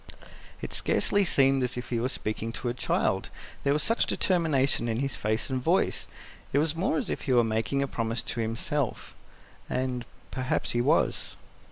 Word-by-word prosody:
It - - -4
scarcely 205 0 +2
seemed 135 -5 +4
as 125 -1 0
if 125 - -5
he 120 - 0
were 125 +3 0
speaking 110 -2 -3
to 120 - -2
a - - -1
child, 120 - 0 0.3
there 140 - +2
was 150 +1 +1
such 230 +1 +2
determination 145 -9 +2
in 110 - 0
his 135 0 -1
face 110 +1 -1
and 130 -1 0
voice; - - +1 0.5
it - - +3
was 155 +2 +2
more 165 -1 +1
as - - 0
if - - -2
he - - +4
were 120 -1 +6
making 115 +5 0
a - - -1
promise 115 -2 -2
to 120 - -4
himself 115 +4 -2 0.6
and 125 -1 -1 0.3
perhaps 130 -1 -1
he 120 - +1
was. - - +1
130 Hz, 185 wpm, -28 LUFS, 115-140 Hz, 0.6 s, were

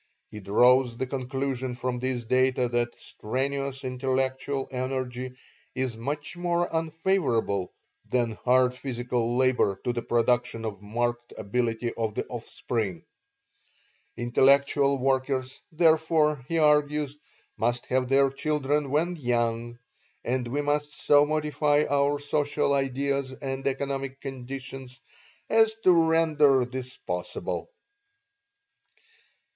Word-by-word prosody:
He 105 - -7
draws 120 +5 +4
the 130 - -1
conclusion 130 -1 -3
from 125 0 -3
these 125 -2 -2
data 130 +1 +2
that 120 0 -1
strenuous 135 +4 -3
intellectual 130 +1 -1
energy 130 -1 -3 0.4
is 130 -3 -1
much 145 +8 -4
more 175 0 0
unfavorable 160 - 0 0.4
than 120 -2 +1
hard 125 +3 +2
physical 120 -2 -2
labor 130 -7 +2
to 125 - 0
the 120 - -2
production 120 -1 0
of 100 -3 -5
marked 120 +3 -2
ability 115 +2 -1
in 110 -2 -2
the - - -2
offspring. 110 -6 -4 1.1
Intellectual 140 +3 +3
workers, 130 0 -1
therefore, 160 -3 +3
he 165 - -1
argues, 150 -2 +2 0.4
must 120 +1 0
have 130 -1 0
their 135 0 +4
children 145 0 -1
when 170 +5 0
young, 120 -3 -1 0.5
and 125 0 -1
we 140 +5 -1
must 145 0 -1
so 145 0 +5
modify 150 -1 +1
our 140 +1 +2
social 145 0 0
ideals 140 0 0
and 135 0 -4
economic 135 0 -2
conditions 135 -1 -7 0.5
as 220 0 +4
to 185 - +7 0.2
render 150 -5 +4
this 125 0 -7
possible. 90 - -4
130 Hz, 110 wpm, -27 LUFS, 120-145 Hz, 1.1 s, to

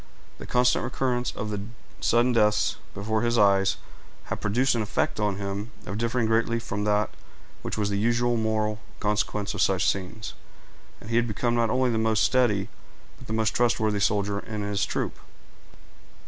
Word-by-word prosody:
The - - -8
constant 125 0 +3
recurrence 125 -2 -1
of 105 0 -3 0.4
sudden 120 +2 +3
deaths 105 -2 +3 0.2
before 110 +2 -1
his 120 0 +1
eyes 100 -2 +4 0.5
had - - -5
produced 125 +6 +2
an 115 - 0
effect 105 - -1
on 105 -2 +1
him 100 +2 -4 0.3
differing 115 +2 0
greatly 115 +1 +2
from 105 -3 -3
that 105 0 +1 0.5
which - - -4
was 105 -1 0
the 100 - 0
usual 120 +2 +2
moral 110 -1 0 0.2
consequence 105 0 -1
of 100 - -2
such 95 -2 +2
scenes; 100 +3 -2 0.7
and 110 - -9
he 115 - +2
had 120 0 +2
become 120 +2 0
not 115 -1 +2
only 130 +1 +2
the 110 - 0
most 110 -1 +2
steady, 110 -7 +2 0.5
but 130 - -13
the 110 - -3
most 110 -1 +1
trustworthy 110 -3 +2
soldier 100 0 +1
in 105 0 -5
his 100 0 -1
troop. - - -3
110 Hz, 165 wpm, -26 LUFS, 105-120 Hz, 0.7 s, eyes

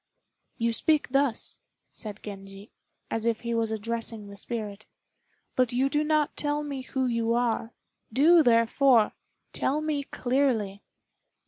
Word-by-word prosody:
"You 230 0 0
speak 305 +5 +2
thus," 275 -3 0 0.3
said 210 -2 -7
Genji, 195 0 -9 0.4
as 225 +1 -1
if 230 -1 0
he 235 0 -2
was 230 -1 +1
addressing 225 0 -4
the 200 - -10
spirit, 210 -1 -5 0.7
"but 255 -2 +2
you 265 +3 +2
do 295 +1 +1
not 305 -1 +1
tell 295 0 0
me 280 -2 -4
who 260 0 -2
you 230 -2 +1
are. 235 -1 -1 0.4
Do, 320 +8 +6
therefore, 230 -1 +4 0.4
tell 290 +3 0
me 305 -2 -1
clearly." 245 -8 0
235 Hz, 135 wpm, -27 LUFS, 220-275 Hz, 0.7 s, Do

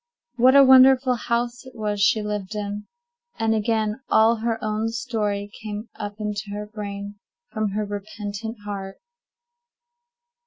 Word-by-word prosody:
What 255 +3 +6
a 280 - +9
wonderful 260 0 +7
house 240 0 -2
it 260 0 -14
was 210 -2 -2
she 215 +1 +3
lived 210 -1 -4
in! 205 0 -4 0.5
And 225 0 +1
again 220 0 0
all 225 +1 +5
her 225 0 -1
own 215 +1 -1
story 210 -4 -2
came 215 +1 -6
up 205 -1 -6
into 210 -1 -4
her 210 0 -4
brain 205 -1 -7 0.3
from 215 -4 -1
her 210 0 -1
repentant 205 +2 -6
heart. 195 -1 -6
215 Hz, 140 wpm, -24 LUFS, 205-230 Hz, 0.5 s, a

